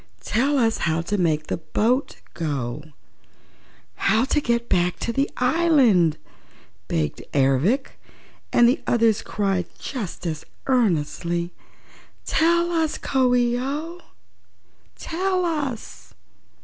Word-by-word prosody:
"Tell 275 Hz, +6 st, +1 dB
us 225 Hz, -3 st, +2 dB
how 165 Hz, -1 st, 0 dB
to 205 Hz, +5 st, -2 dB
make 155 Hz, -3 st, +1 dB
the -, -, -2 dB
boat 235 Hz, -, 0 dB, 0.2 s
go 145 Hz, -4 st, -3 dB, 1.1 s
how 220 Hz, +5 st, +2 dB
to 295 Hz, +2 st, +1 dB
get 235 Hz, -2 st, 0 dB
back 180 Hz, 0 st, +1 dB
into 235 Hz, -, -3 dB
the 275 Hz, +3 st, +1 dB
island," 250 Hz, -, +3 dB, 0.7 s
begged 75 Hz, -3 st, -2 dB
Ervic 140 Hz, -, +1 dB, 0.5 s
and 240 Hz, -, +5 dB
the 250 Hz, -, +2 dB
others 230 Hz, -2 st, +3 dB
cried 195 Hz, -4 st, -1 dB
just 220 Hz, -10 st, -6 dB
as 160 Hz, -2 st, -3 dB, 0.2 s
earnestly: 175 Hz, -, 0 dB, 0.7 s
"Tell 340 Hz, +1 st, +2 dB
us, 325 Hz, -2 st, 0 dB
Coo 255 Hz, -2 st, +1 dB
ee 240 Hz, 0 st, +2 dB
oh; 305 Hz, +7 st, -4 dB, 0.9 s
tell 365 Hz, +2 st, -1 dB
us!" 290 Hz, -9 st, -4 dB
235 Hz, 110 wpm, -23 LUFS, 170-275 Hz, 1.1 s, and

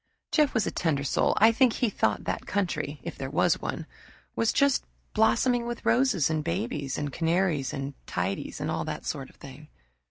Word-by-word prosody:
Jeff 300 Hz, -4 st, +3 dB
was 220 Hz, -4 st, +2 dB
a -, -, -1 dB
tender 145 Hz, -5 st, 0 dB
soul. 140 Hz, -, +1 dB
I 220 Hz, +2 st, +7 dB
think 240 Hz, 0 st, +3 dB
he 245 Hz, -, +1 dB
thought 210 Hz, -, 0 dB
that -, -, -3 dB
country 150 Hz, -7 st, -2 dB
if -, -, -7 dB
there 135 Hz, -, -3 dB
was 145 Hz, -, +2 dB
one -, -, -4 dB, 0.5 s
was 230 Hz, -, +2 dB
just 280 Hz, -1 st, +3 dB, 0.3 s
blossoming 235 Hz, +2 st, +3 dB
with 240 Hz, 0 st, -5 dB
roses 240 Hz, -, +3 dB
and 155 Hz, -1 st, -1 dB
babies 170 Hz, -, -2 dB
and 145 Hz, -2 st, -3 dB
canaries 165 Hz, -5 st, +1 dB
and 140 Hz, +1 st, -4 dB
tidies, 90 Hz, +2 st, -3 dB
and -, -, -2 dB
all -, -, -1 dB
that -, -, -5 dB
sort 135 Hz, -1 st, -4 dB
of -, -, -21 dB
thing. 140 Hz, +2 st, -12 dB
170 Hz, 190 wpm, -27 LUFS, 145-230 Hz, 0.5 s, I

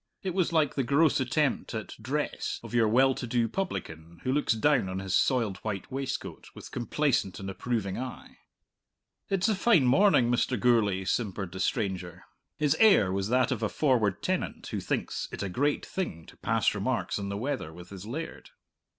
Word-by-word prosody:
It 185 Hz, -2 st, -2 dB
was 180 Hz, -2 st, +1 dB
like 155 Hz, -4 st, +2 dB
the 135 Hz, -, 0 dB
gross 140 Hz, +5 st, +3 dB
attempt 130 Hz, 0 st, 0 dB
at 110 Hz, -, -5 dB
dress 145 Hz, +6 st, -2 dB
of -, -, -9 dB
your 115 Hz, -2 st, +4 dB
well 130 Hz, +5 st, +4 dB
to 125 Hz, -, -5 dB
do 115 Hz, 0 st, +1 dB
publican 85 Hz, -, -5 dB
who 130 Hz, -, 0 dB
looks 145 Hz, -3 st, +2 dB
down 120 Hz, -3 st, +2 dB
on 95 Hz, -, -4 dB
his 95 Hz, -1 st, -1 dB
soiled 115 Hz, -8 st, +2 dB
white 105 Hz, +3 st, -5 dB
waistcoat 135 Hz, 0 st, -4 dB
with -, -, -10 dB
complacent 125 Hz, -5 st, 0 dB
and 95 Hz, -1 st, -5 dB
approving 105 Hz, -2 st, -2 dB
eye. 130 Hz, 0 st, -8 dB, 0.9 s
"It's 195 Hz, +1 st, +1 dB
a 220 Hz, -, +3 dB
fine 195 Hz, -, +4 dB
morning, 130 Hz, -3 st, +4 dB
Mr. 125 Hz, 0 st, +1 dB
Gourlay," 105 Hz, -5 st, +2 dB
simpered 95 Hz, -4 st, -2 dB
the 95 Hz, -, -7 dB
stranger. 90 Hz, -2 st, -2 dB, 0.3 s
His 150 Hz, -1 st, +2 dB
air 195 Hz, -, +6 dB
was 95 Hz, +1 st, -1 dB
that 125 Hz, 0 st, +2 dB
of -, -, -1 dB
a 110 Hz, -, 0 dB
forward 125 Hz, -9 st, +1 dB
tenant -, -, -2 dB
who -, -, -2 dB
thinks -, -, -3 dB
it -, -, -4 dB
a 100 Hz, -, -2 dB
great 145 Hz, +10 st, 0 dB
thing 85 Hz, -, -4 dB
to -, -, -16 dB
pass -, -, +1 dB
remarks -, -, -1 dB
on 100 Hz, -1 st, -4 dB
the 100 Hz, -, -3 dB
weather 115 Hz, -, -3 dB
with 85 Hz, +3 st, -12 dB
his 100 Hz, +1 st, -8 dB
laird. 160 Hz, +8 st, -6 dB
120 Hz, 185 wpm, -28 LUFS, 95-145 Hz, 0.9 s, air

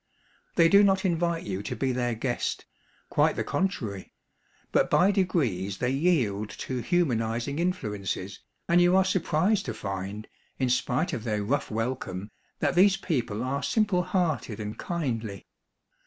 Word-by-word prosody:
They 165 Hz, -2 st, +6 dB
do 200 Hz, +4 st, +7 dB
not 195 Hz, -1 st, +3 dB
invite 170 Hz, -1 st, 0 dB
you 95 Hz, -1 st, -3 dB
to 105 Hz, -, -4 dB
be 135 Hz, -1 st, 0 dB
their 120 Hz, -1 st, -1 dB
guest, 120 Hz, +2 st, -2 dB, 0.5 s
quite -, -, +3 dB
the -, -, -1 dB
con 190 Hz, +1 st, +1 dB
trary. 100 Hz, -, -6 dB, 0.6 s
But -, -, +3 dB
by 190 Hz, +3 st, +5 dB
degrees 125 Hz, -, 0 dB
they 125 Hz, 0 st, 0 dB
yield 130 Hz, -, +1 dB
to 130 Hz, -1 st, -3 dB
humanizing 120 Hz, -4 st, 0 dB
influences, 105 Hz, -, -2 dB, 0.3 s
and 175 Hz, +1 st, +5 dB
you 175 Hz, +1 st, +5 dB
are 190 Hz, 0 st, +5 dB
surprised 185 Hz, +4 st, +1 dB
to 110 Hz, -, -3 dB
find, 100 Hz, +1 st, -5 dB, 0.3 s
in 130 Hz, -2 st, 0 dB
spite 140 Hz, +7 st, 0 dB
of 115 Hz, -, -3 dB
their 105 Hz, -3 st, -1 dB
rough 140 Hz, +8 st, -1 dB
welcome, 110 Hz, -4 st, -3 dB, 0.3 s
that -, -, +2 dB
these 190 Hz, +2 st, +5 dB
people 125 Hz, -, -2 dB
are 135 Hz, +2 st, -1 dB
simple 210 Hz, -5 st, +2 dB
hearted 170 Hz, -, -1 dB
and 105 Hz, 0 st, -4 dB
kindly. 115 Hz, -, -3 dB
130 Hz, 155 wpm, -27 LUFS, 110-175 Hz, 0.6 s, do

